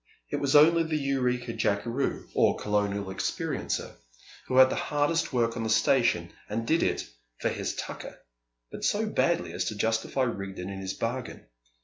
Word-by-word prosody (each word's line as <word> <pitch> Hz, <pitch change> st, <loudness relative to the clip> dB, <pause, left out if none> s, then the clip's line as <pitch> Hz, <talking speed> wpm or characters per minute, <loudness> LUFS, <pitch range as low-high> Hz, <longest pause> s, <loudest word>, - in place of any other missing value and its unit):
It -, -, 0 dB
was 140 Hz, 0 st, +1 dB
only 165 Hz, +3 st, +7 dB
the 160 Hz, -1 st, 0 dB
Eureka 125 Hz, -4 st, 0 dB
jackeroo 115 Hz, +7 st, -1 dB
(or -, -, +3 dB
"Colonial 100 Hz, -1 st, 0 dB
experiencer"), 95 Hz, -, -2 dB, 0.6 s
who 130 Hz, -, 0 dB
had 130 Hz, 0 st, +8 dB
the -, -, 0 dB
hardest 150 Hz, +3 st, 0 dB
work 115 Hz, -3 st, +1 dB
on 115 Hz, -, -3 dB
the 110 Hz, -, -2 dB
station, 110 Hz, -6 st, +2 dB, 0.2 s
and 115 Hz, +2 st, -2 dB
did 160 Hz, +7 st, +2 dB
it -, -, 0 dB, 0.3 s
"for -, -, 0 dB
his -, -, -3 dB
tucker," -, -, -7 dB, 0.5 s
but -, -, -8 dB
so 215 Hz, +2 st, +1 dB
badly 170 Hz, -, 0 dB
as 90 Hz, +1 st, -1 dB
to 110 Hz, -, -3 dB
justify 110 Hz, +5 st, 0 dB
Rigden 100 Hz, -5 st, -4 dB
in 95 Hz, 0 st, -6 dB
his 95 Hz, 0 st, -4 dB
bargain. 120 Hz, +1 st, -4 dB
120 Hz, 165 wpm, -28 LUFS, 105-140 Hz, 0.6 s, had